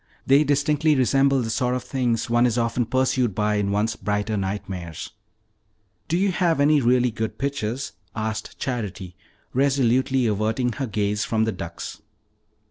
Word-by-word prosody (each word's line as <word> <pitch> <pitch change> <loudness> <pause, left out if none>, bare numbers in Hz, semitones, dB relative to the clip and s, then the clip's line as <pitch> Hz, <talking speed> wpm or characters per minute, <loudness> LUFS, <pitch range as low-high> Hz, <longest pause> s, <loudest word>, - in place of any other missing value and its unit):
They 140 +3 +5
distinctly 150 +1 +2
resemble 135 0 +3
the 115 - -3
sort 125 +1 0
of 125 - -3
things 120 -4 -1
one 120 +1 +3
is 120 0 -1
often 115 0 0
pursued 130 -4 +1
by 105 0 +1
in 100 -1 0
one's 105 +3 0
brighter 105 +1 -2
nightmares." 95 -4 -4 1.0
"Do 170 - +1
you 195 +1 +2
have 175 -4 +1
any 145 0 +4
really 125 0 +3
good 110 0 -4
pictures?" 135 -2 -3 0.2
asked 110 -1 -4
Charity, 100 -8 -4 0.4
resolutely 130 -1 +2
averting 110 +3 0
her 135 +3 -3
gaze 105 -1 -1
from 110 -1 0
the 110 - +1
ducks. 85 -3 -7
120 Hz, 150 wpm, -24 LUFS, 105-135 Hz, 1.0 s, They